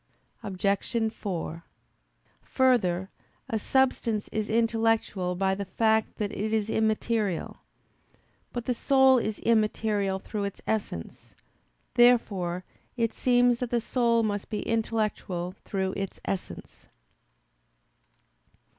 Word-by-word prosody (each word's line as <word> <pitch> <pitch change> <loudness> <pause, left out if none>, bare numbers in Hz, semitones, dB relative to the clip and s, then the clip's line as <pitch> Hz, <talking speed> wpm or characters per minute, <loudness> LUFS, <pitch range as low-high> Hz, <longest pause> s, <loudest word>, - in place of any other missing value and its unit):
Obj. 205 +2 -1
4: 170 -4 -5 0.8
Further, 195 -8 +1 0.4
a 220 - -1
substance 235 -3 +1
is 215 -1 -2
intellectual 225 -5 +1
by 190 +1 +1
the 200 +1 -3
fact 220 +3 +1
that 210 -2 -2
it 215 +2 -3
is 220 -1 0
immaterial. 220 -3 0 0.9
But 240 -1 -4
the 250 - +1
soul 265 +1 +5
is 215 -2 -2
immaterial 215 -3 +1
through 200 +1 -4
its 200 - -5
essence. 200 - -4 0.6
Therefore 195 -8 +3 0.3
it 230 -2 0
seems 245 -1 +3
that 250 - -2
the 240 - +1
soul 235 -1 +2
must 205 -2 -2
be 210 - -3
intellectual 215 -6 -1
through 190 -1 -1
its 195 -1 -4
essence. 195 - -6
215 Hz, 110 wpm, -27 LUFS, 195-230 Hz, 0.9 s, soul